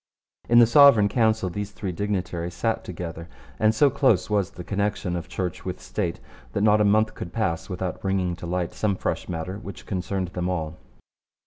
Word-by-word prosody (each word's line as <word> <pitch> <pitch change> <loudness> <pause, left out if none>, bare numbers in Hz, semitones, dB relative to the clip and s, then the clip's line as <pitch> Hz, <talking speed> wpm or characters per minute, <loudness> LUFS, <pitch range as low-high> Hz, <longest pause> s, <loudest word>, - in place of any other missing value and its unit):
In 120 - +5
the 120 - +9
Sovereign 115 -3 +7
Council 110 -3 +2
these 105 +3 -4
three 100 -2 -5
dignitaries 90 -2 -3
sat 115 -1 -1
together, 85 -1 -7 0.3
and 110 0 +3
so 140 +4 +4
close 135 -5 +2
was 100 -3 +1
the 90 - -9
connection 100 -1 -1
of 85 -1 -4
Church 90 -3 -4
with - - -5
State - - -3 0.3
that - - -1
not 105 0 +5
a - - +5
month 110 +2 +3
could 85 - -7
pass 85 -5 -2
without 90 -2 -4
bringing 95 -2 0
to 85 - -7
light 90 0 -2
some 105 -2 0
fresh - - -3
matter 90 +3 -4
which 100 -3 -9
concerned 95 -1 -2
them 90 0 -3
all. 80 -3 -3
95 Hz, 190 wpm, -25 LUFS, 90-105 Hz, 0.3 s, the